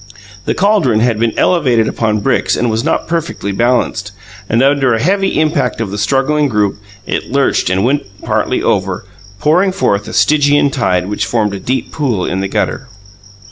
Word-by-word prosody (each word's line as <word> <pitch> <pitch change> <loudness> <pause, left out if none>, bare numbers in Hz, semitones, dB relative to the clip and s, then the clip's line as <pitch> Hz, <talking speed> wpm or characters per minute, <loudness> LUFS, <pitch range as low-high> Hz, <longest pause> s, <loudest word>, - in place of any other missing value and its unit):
The - - -1
caldron 185 - +2
had 115 -2 +1
been 115 -1 0
elevated 125 -11 +2
upon 110 -2 -1
bricks - - +1
and 120 -1 0
was 110 +1 -1
not - - -1
perfectly 165 - -3
balanced; 115 -2 0 0.4
and 115 +3 +2
under 135 -3 +3
a - - -2
heavy 195 - +1
impact 155 -5 0
of 110 -4 -3
the 105 - -4
struggling 135 +7 +1
group 105 -4 0 0.3
it - - -3
lurched 140 -8 +1
and 95 +1 +1
went 140 0 0 0.2
partly - - -1
over, - - -1 0.3
pouring 180 - +2
forth 100 - 0
a - - -7
Stygian 145 -1 +3
tide 90 -9 0
which 105 - -2
formed 105 -3 0
a 100 - -4
deep 130 +6 -3
pool 125 - -1
in 95 - -2
the 95 - -1
gutter. 125 +6 -2
125 Hz, 180 wpm, -14 LUFS, 105-145 Hz, 0.4 s, under